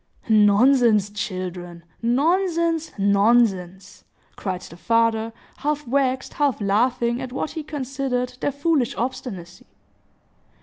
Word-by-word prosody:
"Nonsense, 215 0 +4
children, 185 -4 -5 0.2
nonsense, 330 +6 +1
nonsense!" 200 -2 +1 0.3
cried 185 -2 -4
the - - -11
father, 230 +4 +1 0.3
half 295 +1 -2
vexed, 260 0 0
half 285 -5 0
laughing 235 +4 +1
at 260 -1 -6
what 270 +4 -3
he 320 - -5
considered 265 -4 -3
their 285 - -1
foolish 285 -3 0
obstinacy. 215 -8 -5
235 Hz, 100 wpm, -22 LUFS, 200-275 Hz, 0.3 s, Nonsense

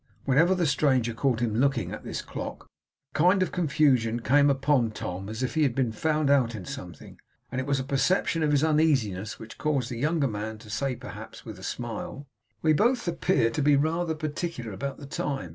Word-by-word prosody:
Whenever 160 +8 +4
the 180 -2 +1
stranger 130 -5 +2
caught 120 0 0
him 115 -3 0
looking 120 -4 +1
at - - -7
this - - -4
clock, - - -6 0.5
a - - -29
kind 185 +4 +4
of - - -3
confusion 140 -9 +2
came 140 +5 +4
upon 135 -3 +2
Tom 95 -2 -5
as 110 +4 -4
if 130 - -1
he 160 - +1
had 135 -5 +2
been 130 -4 +1
found 155 +6 0
out 130 -5 +3
in 95 -4 -7
something; - - -9 0.3
and 130 +1 -1
it 130 - -6
was 140 -1 +1
a - - -2
perception 160 +5 +1
of 155 - +2
his 145 0 +3
uneasiness 130 - +1
which 110 - -11
caused 140 -6 0
the 120 - -4
younger 150 +1 +1
man 110 -1 -4
to 110 -1 -12
say, 135 +3 -1
perhaps, - - -10
with - - -8
a - - -12
smile: 120 +4 -5 0.4
'We 155 -1 +5
both 240 - +2
appear 165 -8 +2
to 115 - -1
be 145 0 +5
rather 160 +3 0
particular 155 -5 -4
about 135 +8 -4
the 145 - -9
time. 140 - -3
140 Hz, 210 wpm, -27 LUFS, 115-155 Hz, 0.5 s, We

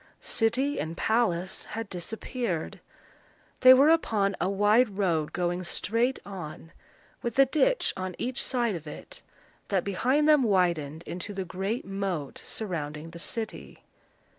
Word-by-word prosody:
City 260 +6 0
and 165 +2 -4
palace 190 -6 0
had 225 0 -5
disappeared. 200 0 -4 0.8
They 255 - +9
were 270 +4 +7
upon 210 - +2
a 180 - +1
wide 205 +2 +3
road 165 -6 +1
going 175 0 -1
straight 230 +8 0
on, 170 -4 -8 0.5
with 235 0 -3
a 275 - +7
ditch 415 - +2
on 185 -1 -4
each 250 +1 -2
side 240 -4 0
of 160 -3 -7
it, 150 - -9 0.5
that 195 -3 +1
behind 255 +10 +1
them 300 -2 +6
widened 170 - +1
into 185 +3 -6
the 190 -1 -3
great 195 +6 -3
moat 195 -7 -3
surrounding 160 -6 -5
the 170 - -9
city. 220 +5 -5
200 Hz, 140 wpm, -28 LUFS, 175-235 Hz, 0.8 s, They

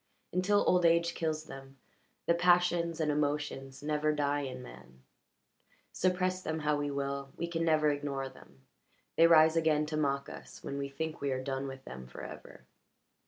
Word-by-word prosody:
Until 195 +3 +3
old 180 -1 +4
age 170 0 +4
kills 155 -2 -2
them, 135 -1 -11 0.5
the 170 - +4
passions 175 -1 +3
and 155 -2 +1
emotions 145 -2 -2
never 150 0 +1
die 145 -1 0
in 130 -3 -5
man; 65 - -14 0.9
suppress 185 0 0
them 160 -2 -3
how 150 0 +2
we 145 0 -2
will, 140 -1 -3
we 170 - -2
can 165 -1 -2
never 155 -2 +3
ignore 140 -2 -3
them; 70 - -17 0.5
they 165 - +7
rise 160 -1 +6
again 155 -2 +3
to 155 0 -3
mock 140 -2 0
us - - -11
when 140 - -4
we 140 0 -3
think 160 +3 -5
we 140 -1 0
are 130 0 -2
done 135 0 -3
with 135 0 -9
them 65 0 -8
forever. 65 - -10
150 Hz, 170 wpm, -32 LUFS, 140-165 Hz, 0.9 s, they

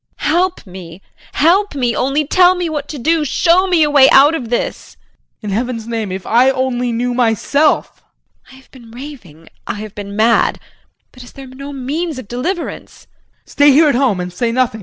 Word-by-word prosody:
JULIE. 300 - -2
Help 360 -1 0
me, 180 -1 -11 0.3
help 360 +4 +2
me. 245 -4 -1
Only 275 +4 0
tell 365 +4 +4
me 355 -2 -3
what 295 -2 -4
to 300 - -7
do 315 +4 0
show 345 +6 +2
me 350 -4 +3
a 300 - +1
way 275 -2 +6
out 285 +3 +6
of 255 -8 -5
this! 240 - -4 0.5
JEAN. 210 -2 -5
In - - -1
heaven's 230 -1 -3
name, 225 -4 -4
if 190 0 -6
I 245 +3 +3
only 255 -2 -1
knew 245 +2 -2
myself. 250 +5 0 0.5
JULIE. - - -17
I - - -15
have 265 0 -20
been 240 -4 -16
raving, 230 - -12 0.2
I - - -3
have 210 -1 -8
been 200 -1 -8
mad, 225 +2 +2 0.5
but 255 - -15
is 245 - -14
there 275 - -11
no 270 +2 -10
means 285 +4 -4
of 255 - -9
deliverance? 330 - -5
JEAN. - - -43
Stay 290 0 +3
here 305 +2 +5
at - - +1
home 245 -6 +1
and 180 0 -5
say 230 +5 -2
nothing. 240 -2 -1
260 Hz, 205 wpm, -16 LUFS, 230-300 Hz, 0.5 s, way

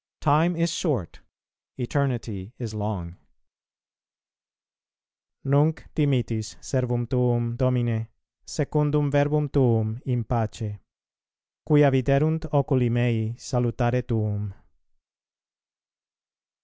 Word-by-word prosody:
Time 160 +4 +3
is 170 0 +1
short, 130 - -2 0.6
eternity 120 -6 -2
is 115 -3 -5
long. 100 -5 -4 2.3
NUNC 145 +3 +2
DIMITTIS 120 -7 0
SERVUM 125 -2 -1
TUUM, 120 -1 0
DOMINE, 120 -3 0 0.4
SECUNDUM 150 -1 0
VERBUM 145 +1 +2
TUUM 115 -4 +2
IN 125 -3 -1
PACE: 110 -2 -3 0.9
QUIA 150 -2 +6
VIDERUNT 140 +5 +2
OCULI 135 -4 +2
MEI 115 -1 0
SALUTARE 125 -1 0
TUUM. 105 -4 -3
125 Hz, 80 wpm, -25 LUFS, 115-145 Hz, 2.3 s, QUIA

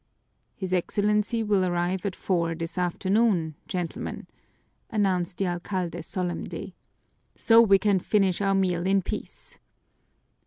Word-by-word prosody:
"His 185 -2 -4
Excellency 210 +5 +1
will 205 -3 +2
arrive 180 +2 -1
at 190 - -4
four 170 -3 0
this 165 0 -5
afternoon, 180 -1 +1
gentlemen!" 180 -3 -4 0.6
announced 185 -4 0
the 195 - 0
alcalde 175 -1 -3
solemnly. 180 +2 -4 0.6
"So 230 0 +6
we 200 -4 +6
can 200 -1 +2
finish 195 -1 +1
our 195 -1 +2
meal 180 -2 +1
in 195 0 +3
peace." - - -7
185 Hz, 120 wpm, -26 LUFS, 175-200 Hz, 0.6 s, So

